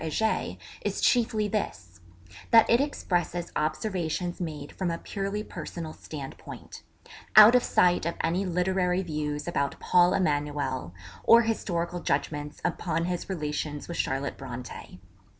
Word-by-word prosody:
Heger 220 +8 -1 0.3
is - - -2
chiefly 225 -3 +2
this: 95 - -4 0.5
that 225 -1 +7
it 235 +3 +4
expresses 175 - -2
observations 175 +1 -2
made 150 -4 -5
from 185 -2 -2
a 165 - -2
purely 200 +3 -4
personal 165 -6 -7
standpoint; 140 -3 -9 0.5
out 215 +2 +10
of 250 - +6
sight 175 -2 +3
of 170 - -2
any 175 +4 +1
literary 180 0 +1
views 150 -2 -3
about 140 -5 -1
'Paul 180 0 +4
Emanuel,' 145 - -1 0.3
or 235 +1 +7
historical 175 -6 -2
judgments 145 -1 -2
upon 165 -1 -1
his 180 +1 -3
relations 150 -4 -3
with 170 - -5
Charlotte 135 +1 -2
Brontë. 125 -7 -8
170 Hz, 130 wpm, -27 LUFS, 150-190 Hz, 0.5 s, out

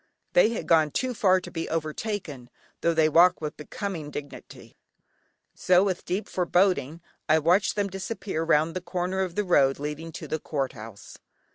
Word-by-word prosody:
They 180 +5 +5
had 230 - -4
gone 160 -2 +4
too 255 - -2
far 190 -4 +3
to - - -10
be 165 -1 -4
overtaken, 155 - -4 0.3
tho' 170 -1 +1
they 160 -1 +4
walked 170 +4 +5
with 150 -1 -5
becoming 160 0 -6
dignity, 145 -1 -10 0.8
so 180 +1 +3
with 190 -3 -2
deep 190 +4 -2
foreboding, 175 -4 +1 0.3
I 155 - +6
watched 175 +6 +2
them 205 -1 0
disappear 195 -2 -4
round 160 0 +2
the 185 - -3
corner 180 +1 -3
of 185 -2 -2
the 210 - +1
road 135 -8 +3
leading 150 +3 -5
to - - -7
the 155 - -2
Court 140 -4 -3
House. 110 -2 -11
170 Hz, 170 wpm, -26 LUFS, 150-190 Hz, 0.8 s, I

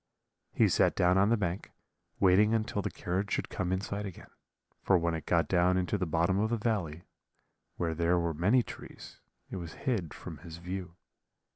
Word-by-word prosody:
"He - - +4
sat - - +3
down 90 +1 +4
on 100 +2 +4
the 115 - +3
bank, 90 -2 -3 0.5
waiting 100 +4 +5
until 110 -2 -1
the - - -2
carriage 95 +3 -3
should - - -1
come 95 -5 -2
in 95 0 0
sight 100 +1 -4
again: 95 -4 -9 0.5
for 95 - +4
when 85 -1 0
it 80 - -5
got 85 -1 +2
down 90 0 +3
into 90 +2 0
the 90 -3 -1
bottom 85 +4 +1
of 110 +1 +1
the 120 - 0
valley, 90 -8 -2 0.7
where 85 -2 -1
there 85 +2 +2
were 85 -1 0
many 100 +11 +3
trees, - - -11 0.3
it - - -4
was 85 -3 -7
hid 100 - 0
from - - -9
his 85 -2 -9
view. 90 0 -6
90 Hz, 190 wpm, -30 LUFS, 85-100 Hz, 0.7 s, waiting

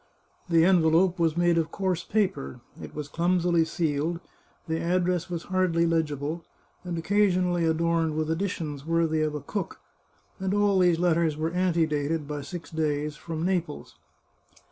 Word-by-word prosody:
The 165 -1 +5
envelope 175 0 +4
was 165 -1 +1
made 175 -1 +3
of 160 -1 -1
coarse 185 -2 -1
paper, 190 - -1 0.2
it - - -9
was 150 -1 -4
clum 175 +4 +1
sily 170 -1 +3
sealed, 160 0 -1 0.5
the 160 0 -1
address 180 0 0
was 170 -2 -4
hardly 180 -3 +1
legible, 160 -1 -1 0.4
and 175 -2 -4
occasionally 180 -2 +2
adorned 165 -1 +1
with 155 0 -1
additions 160 -5 -3
worthy 165 -1 +1
of 155 -1 -1
a 150 - -4
cook, 200 +8 -5 0.6
and 190 +1 -1
all 205 -2 +3
these 175 -2 +4
let 175 0 +3
ters 160 -2 +1
were 160 +1 -1
antedated, 165 -4 0
by 145 -1 -4
six 170 +3 -8
days, 150 -1 -1
from 165 +1 -5
Naples. 175 -5 -2
165 Hz, 155 wpm, -27 LUFS, 155-180 Hz, 0.6 s, The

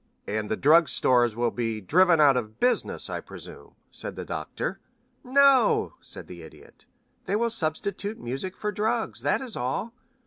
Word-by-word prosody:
"And 105 0 -3
the 110 - -1
drug 160 +2 +5
stores 120 -3 +2
will 120 0 0
be 115 -2 -3
driven 170 - +3
out 145 -3 +6
of 110 -3 -4
business, 250 - +1
I - - -4
presume," - - -12 0.2
said - - -1
the - - -6
Doctor. - - -5 0.4
"No," 270 -2 +4
said - - -5
the 85 -1 -11
Idiot. 80 - -15 0.4
"They 195 - 0
will 235 +2 +1
substitute 200 +3 -1
music 135 +10 -5
for 210 - -3
drugs, 220 +2 -1
that - - +1
is 255 -4 -4
all. 135 - -3
160 Hz, 165 wpm, -26 LUFS, -, 0.4 s, out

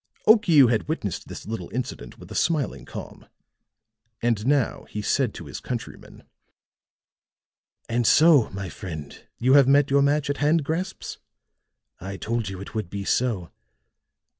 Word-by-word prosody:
Okiu 195 - +6
had 115 - 0
witnessed 105 - -3
this - - -9
little 110 -5 -5
incident 120 - -5
with - - -13
a - - -5
smiling 140 - -1
calm. - - -9 0.9
And 115 -1 0
now 140 -3 +1
he 105 - -5
said 125 +1 +1
to - - -8
his - - -7
countryman: 120 -3 -7 1.6
"And 120 0 0
so, 155 -6 +6
my 95 0 -6
friend, 80 -6 -8
you 130 +3 +2
have 140 -2 +7
met 140 0 +4
your 140 0 +4
match 145 +1 +2
at 145 0 -1
hand 150 +2 +2
grasps? 175 +6 -4 0.8
I 95 +1 -6
told 115 -1 -2
you 95 -1 -7
it 100 - -9
would 110 -6 -3
be 100 0 -5
so. 105 -10 0
120 Hz, 150 wpm, -24 LUFS, 100-145 Hz, 1.6 s, have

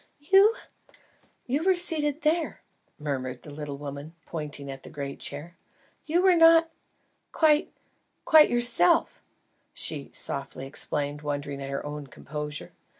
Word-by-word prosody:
"You? 390 +9 +5 0.9
You 275 +5 0
were 380 0 +4
seated 315 -4 +2
there," 320 +2 0 0.3
murmured 130 -4 -4
the 150 - -10
little 145 -1 -6
woman, 145 +3 -8
pointing 145 -3 -6
at 135 0 -9
the - - -11
great 140 -2 -6
chair. 150 +5 -7 0.5
"You 345 +4 +2
were 380 -1 +6
not 330 0 +6 0.6
quite 310 +1 +3 0.5
quite 310 -1 +7
yourself," 240 -7 +2 0.5
she 145 -3 -2
softly 135 -1 -4
explained, 145 +1 -3
wondering 145 -1 -4
at 135 - -5
her 140 +1 -4
own 145 -1 -6
composure. 150 +3 -6
150 Hz, 130 wpm, -27 LUFS, -, 0.9 s, quite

